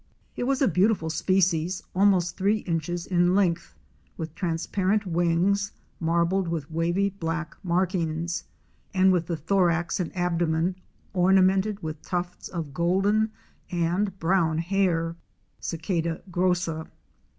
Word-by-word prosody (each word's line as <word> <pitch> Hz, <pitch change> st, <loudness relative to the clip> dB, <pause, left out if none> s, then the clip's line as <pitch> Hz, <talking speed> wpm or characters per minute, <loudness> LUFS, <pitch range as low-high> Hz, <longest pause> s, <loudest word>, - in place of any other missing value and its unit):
It -, -, -2 dB
was 275 Hz, +1 st, +1 dB
a -, -, +5 dB
beautiful 185 Hz, -2 st, +2 dB
species 180 Hz, 0 st, +1 dB
almost 185 Hz, -2 st, +3 dB
three 205 Hz, +2 st, +1 dB
inches 170 Hz, 0 st, -2 dB
in 175 Hz, 0 st, +2 dB
length 175 Hz, -4 st, +1 dB, 0.4 s
with 160 Hz, -1 st, -5 dB
transparent 190 Hz, +4 st, 0 dB
wings 175 Hz, +3 st, +1 dB, 0.3 s
marbled 170 Hz, +3 st, +1 dB
with 160 Hz, -3 st, -3 dB
wavy 175 Hz, +5 st, +1 dB
black 170 Hz, -3 st, -4 dB
markings, 170 Hz, -1 st, -1 dB, 0.5 s
and 190 Hz, 0 st, +5 dB
with 170 Hz, -2 st, 0 dB
the 170 Hz, -, -2 dB
thorax 170 Hz, +1 st, +1 dB
and 175 Hz, -, -2 dB
abdomen 170 Hz, 0 st, +1 dB, 0.4 s
ornamented 190 Hz, +2 st, +3 dB
with 155 Hz, -1 st, -5 dB
tufts 175 Hz, 0 st, -4 dB
of 160 Hz, -6 st, -5 dB
golden 195 Hz, +7 st, +2 dB, 0.4 s
and 180 Hz, +3 st, 0 dB
brown 165 Hz, -2 st, +2 dB
hair 170 Hz, -2 st, 0 dB, 0.4 s
(Cicada 165 Hz, 0 st, -2 dB
grossa). 175 Hz, -3 st, 0 dB
175 Hz, 115 wpm, -26 LUFS, 165-190 Hz, 0.5 s, a